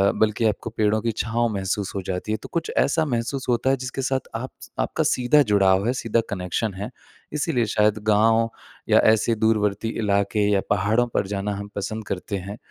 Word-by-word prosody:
बल्कि 110 +1 +1
आपको 110 +1 0
पेड़ों 110 0 +2
की 115 +1 0
छाँव 115 +1 0
महसूस 95 0 -2
हो 95 - -1
जाती 95 +3 -3
है - - 0
तो - - -9
कुछ 170 -1 -1
ऐसा 160 +3 +3
महसूस 130 0 -2
होता 125 +2 +2
है, 135 - +3
जिसके 130 +1 -4
साथ 130 0 -2
आप 130 +3 -4
स - - -11
आपका - - 0
सीधा 125 +4 +3
जुड़ाव 95 +1 +4
है, 125 - +2
सीधा 115 -2 0
कनेक्शन 95 +2 -2
है। 100 +4 -5 0.4
इसीलिए 130 -5 0
शायद 105 0 +3
गाँव 110 +2 +4 0.4
या - - +6
ऐसे 115 +1 +1
दूरवर्ती 105 -1 +1 0.2
इलाके 100 +1 +1
या 100 -1 +3
पहाड़ों 105 +4 +2
पर 95 - +1
जाना 100 +1 -2
हम 100 +1 -7
पसंद 110 +2 -4
करते 100 +2 -3
हैं। 100 +4 -7
110 Hz, 195 wpm, -23 LUFS, 100-120 Hz, 0.4 s, या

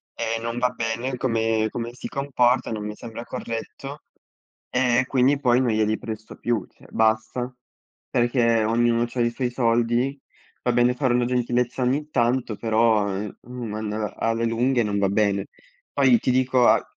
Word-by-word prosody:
e 115 0 -2
non 115 +1 -3
va 125 0 +2
bene 120 +2 -3
come 115 -3 +1
come 120 +1 -5
si - - -7
comporta, 130 -3 +1
non 105 -1 -3
mi 105 0 -5
sembra 115 +1 -8
corretto. 135 +6 -6 0.7
Ehm, 125 -1 +2
e 130 - +1
quindi 135 +2 +2
poi 125 -1 +3
non 120 -3 +1
glieli 110 0 +1
presto 110 -1 -7
più, 120 -2 -1
cioè - - -20
basta. 110 +3 0 0.6
Perché 120 -2 +2
ognuno 115 +1 +2
c'ha 125 - -6
i 120 - +3
suoi 125 0 -2
soldi. 120 +3 +1 0.4
Va 125 - +2
bene 120 +1 +3
fare 125 -1 +1
una 120 0 +2
gentilezza 125 0 0
ogni 145 +5 0
tanto, 120 -3 +1
però, 110 -2 +2
ehm, 100 +1 -5
uhm, 125 -1 -7
mandala 105 0 -3
alle 115 +1 0
lunghe 120 +2 +1
non 105 -1 -1
va 100 -1 +2
bene. 100 -1 +1 0.5
Poi 130 -4 +5
ti 130 - 0
dico 130 -1 +3
a - - +4
120 Hz, 170 wpm, -24 LUFS, 110-125 Hz, 0.7 s, Poi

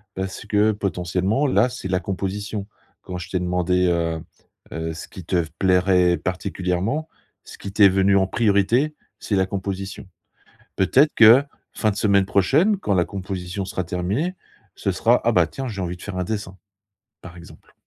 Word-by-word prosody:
parce 95 +2 -5
que, 105 +1 +2
potentiellement, 95 - -1
là, 120 -1 +3
c'est 120 -6 -6
la 90 0 +1
composition. 100 +2 -4 0.3
Quand 90 - -7
je 85 - -7
t'ai 90 - -1
demandé, 90 0 +1
heu 85 -2 0 0.5
heu, 80 0 -4
ce 80 - -8
qui 90 - -11
te 90 - 0
v 85 - 0
plairait 90 -1 +3
particulièrement, 95 - -2 0.3
ce - - -12
qui 100 - -7
t'est 100 -2 +6
venu 95 +1 +3
en 95 - +2
priorité, 115 +8 +2 0.2
c'est 105 - -2
la 95 - +2
composition. 95 0 -5 0.7
Peut-être 135 - +4
que, 115 +4 +8 0.3
fin 110 - +1
de 100 - -5
semaine 100 -2 +3
prochaine, 150 - +2
quand 105 - -1
la 90 -2 +3
composition 95 0 -5
sera 95 -1 -3
terminée, 100 - -2 0.4
ce - - -1
sera: - - +3
«Ah - - +3
bah, - - +4
tiens, 135 -2 -6
j'ai 100 -4 -5
envie 90 0 -4
de - - -15
faire 100 -2 -6
un 90 - -1
dessin» 100 -2 -5 0.7
par 90 -1 -11
exemple. 85 - -15
95 Hz, 175 wpm, -22 LUFS, 90-105 Hz, 0.7 s, que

